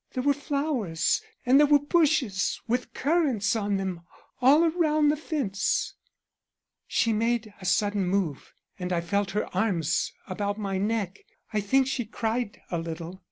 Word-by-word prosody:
There 255 - -2
were 285 +1 +4
flowers 280 - 0 0.2
and 260 +3 +6
there 295 - +6
were 290 0 +6
bushes 290 - +1
with 245 +2 -1
currants 265 - +1
on 205 -2 0
them 190 -3 -3 0.4
all 295 +6 +6
round 310 -3 +3
the - - 0
fence.' 280 -10 -1 0.9
"She 230 -2 +1
made 225 -1 0
a - - -8
sudden 200 +1 +1
move, 180 -7 -1 0.3
and 180 0 -3
I 175 - +1
felt 200 +3 -1
her - - +1
arms 175 -5 +1
about 205 +2 -3
my 195 -3 -2
neck. 205 -2 -1 0.3
I 210 - +1
think 265 +7 +3
she 255 -2 -2
cried 225 0 -3
a 170 - 0
little. 165 +2 -6
215 Hz, 155 wpm, -27 LUFS, 190-275 Hz, 0.9 s, and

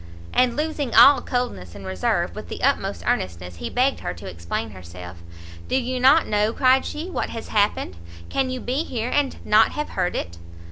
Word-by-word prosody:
And 250 -1 +3
losing 300 -5 -2
all 270 +5 +8
coldness 170 - -3
and 100 -1 -9
reserve, 95 -1 -1
with - - -8
the - - -6
utmost - - 0
earnestness 90 0 -2
he 80 - -5
begged 265 +2 +1
her 90 - -4
to 85 - -10
explain 85 +5 -4
herself. 90 -1 -10 0.5
"Do - - -1
you 255 0 -1
not 275 +6 +6
know," 210 +1 +1
cried 260 0 +3
she, 310 +4 -5
"what 370 - -3
has 230 - -7
happened? 205 - 0 0.3
Can 270 -1 -1
you 255 0 -3
be 265 +6 -1
here 240 -5 -3
and 290 -2 +1
not 215 +1 +4
have 300 0 -3
heard 180 -2 -1
it?" 85 0 -5
225 Hz, 190 wpm, -23 LUFS, -, 0.5 s, all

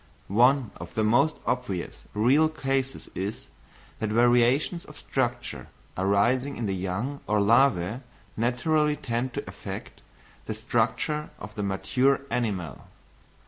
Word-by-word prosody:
One 125 +3 +4
of 85 0 -9
the 110 - +1
most 120 +8 +3
obvious 125 -9 -3
real 135 +9 +4
cases 135 -3 -2
is, 100 +4 -5 0.5
that 110 - -1
variations 120 - +3
of - - -13
structure - - -2 0.3
arising 120 +8 +2
in 120 - -2
the 100 - -1
young 95 +10 -3
or 105 - +2
larvæ 115 -1 +3 0.3
naturally 150 +6 +1
tend 125 -3 -2
to - - -4
affect - - -8 0.5
the 110 - -3
structure 120 +7 0
of 105 - -9
the 105 - -4
mature 100 +8 +1
animal. 100 -10 -2
120 Hz, 125 wpm, -27 LUFS, 105-135 Hz, 0.5 s, One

